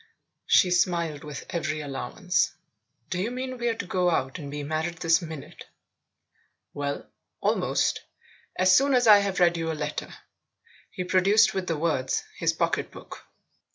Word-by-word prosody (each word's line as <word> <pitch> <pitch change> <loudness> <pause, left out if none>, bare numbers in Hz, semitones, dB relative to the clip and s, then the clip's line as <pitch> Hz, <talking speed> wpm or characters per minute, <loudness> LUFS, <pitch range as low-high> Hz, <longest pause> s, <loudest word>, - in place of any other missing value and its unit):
She 180 - +5
smiled 170 -4 +1
with 150 -1 -7
every 155 -3 -2
allowance. 150 +5 -1 0.6
"Do 180 - -1
you 210 - -1
mean 255 0 -5
we're 240 -1 0
to 200 - -5
go 180 0 +1
out 135 -1 -1
and 145 -2 -7
be 145 +1 -5
married 160 +3 -2
this 165 +1 +3
minute? 160 -4 -9 0.3
" - - -46
" - - -47
Well 145 0 -3 0.3
almost; - - +1 0.5
as 185 0 +5
soon 275 0 +4
as 250 -1 +3
I've 200 -3 +5
read 175 -1 +4
you 165 -1 -2
a 155 - -5
letter." 150 0 -4 0.8
He 185 - -5
produced, 195 +5 +4
with 190 -1 -3
the 165 - -1
words, 150 -5 0 0.2
his - - +2
pocket - - -1
book. - - -12
175 Hz, 160 wpm, -26 LUFS, 155-190 Hz, 0.8 s, She